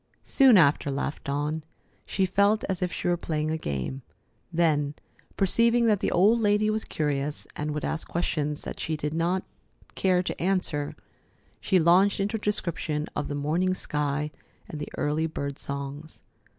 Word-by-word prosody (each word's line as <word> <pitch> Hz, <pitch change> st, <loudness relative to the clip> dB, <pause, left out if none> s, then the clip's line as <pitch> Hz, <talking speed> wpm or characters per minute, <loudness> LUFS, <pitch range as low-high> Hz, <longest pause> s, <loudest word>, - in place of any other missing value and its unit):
"Soon 265 Hz, -6 st, +6 dB
after," 145 Hz, -3 st, +4 dB
laughed 140 Hz, +1 st, -3 dB
Dawn. 150 Hz, +3 st, -2 dB, 0.4 s
She 190 Hz, -, +1 dB
felt 200 Hz, +3 st, +2 dB
as 190 Hz, -1 st, -2 dB
if 180 Hz, -1 st, 0 dB
she -, -, -3 dB
were 175 Hz, 0 st, +2 dB
playing 155 Hz, -2 st, -2 dB
a -, -, 0 dB
game. 70 Hz, -, -3 dB, 0.5 s
Then, 150 Hz, -4 st, +1 dB, 0.4 s
perceiving 230 Hz, +4 st, +3 dB
that 210 Hz, -3 st, +3 dB
the -, -, 0 dB
old 210 Hz, +6 st, +4 dB
lady 210 Hz, 0 st, +3 dB
was 215 Hz, 0 st, -2 dB
curious 145 Hz, -1 st, -2 dB
and 150 Hz, +1 st, -3 dB
would 150 Hz, 0 st, -2 dB
ask 160 Hz, -, -2 dB
questions 150 Hz, -3 st, -1 dB
that -, -, -6 dB
she 155 Hz, -1 st, -2 dB
did 150 Hz, 0 st, -3 dB
not 175 Hz, +3 st, 0 dB, 0.5 s
care 185 Hz, -1 st, +2 dB
to -, -, -4 dB
answer, 175 Hz, -6 st, 0 dB, 0.6 s
she 190 Hz, -, +2 dB
launched 180 Hz, +5 st, +4 dB
into 205 Hz, +3 st, 0 dB
a -, -, -8 dB
description 165 Hz, -7 st, -1 dB
of 145 Hz, -, -2 dB
the 145 Hz, -, -3 dB
morning 165 Hz, +6 st, 0 dB
sky 150 Hz, -2 st, -2 dB, 0.4 s
and 150 Hz, -, -7 dB
the 150 Hz, -, -5 dB
early 155 Hz, +2 st, 0 dB
bird 140 Hz, -3 st, -5 dB
songs. 140 Hz, +2 st, -6 dB
160 Hz, 165 wpm, -27 LUFS, 150-190 Hz, 0.6 s, Soon